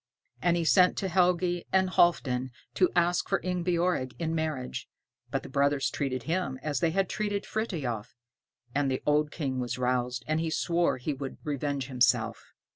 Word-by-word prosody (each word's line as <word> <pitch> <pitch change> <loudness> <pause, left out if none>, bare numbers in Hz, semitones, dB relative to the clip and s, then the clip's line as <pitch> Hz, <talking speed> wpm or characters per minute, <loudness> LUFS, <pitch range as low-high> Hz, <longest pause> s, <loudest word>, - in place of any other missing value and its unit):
And 175 +3 +3
he 170 - 0
sent 180 +2 +5
to 195 - -1
Helgi 175 -1 +2
and 190 -1 +3
Halfdan 130 -8 +2 0.2
to 185 - +3
ask 175 0 +2
for - - +2
Ingebjorg 175 -6 0
in 165 -1 -2
marriage, 155 -5 -3 0.4
but - - -2
the - - -8
brothers 140 0 +1
treated 130 -3 -2
him 160 -3 -1
as 145 -4 -1
they 165 - +2
had 190 +3 +1
treated 205 0 -2
Frithiof; 145 - -3 0.6
and 145 -1 +1
the 130 - -2
old 150 0 +3
King 135 -5 -3
was 125 0 -2
roused, 125 -1 -1
and 155 +1 +1
he 165 0 -1
swore 170 0 +1
he 135 +4 -2
would 135 -1 -6
revenge 145 -2 -2
himself. 120 -3 +1
150 Hz, 170 wpm, -29 LUFS, 130-175 Hz, 0.6 s, sent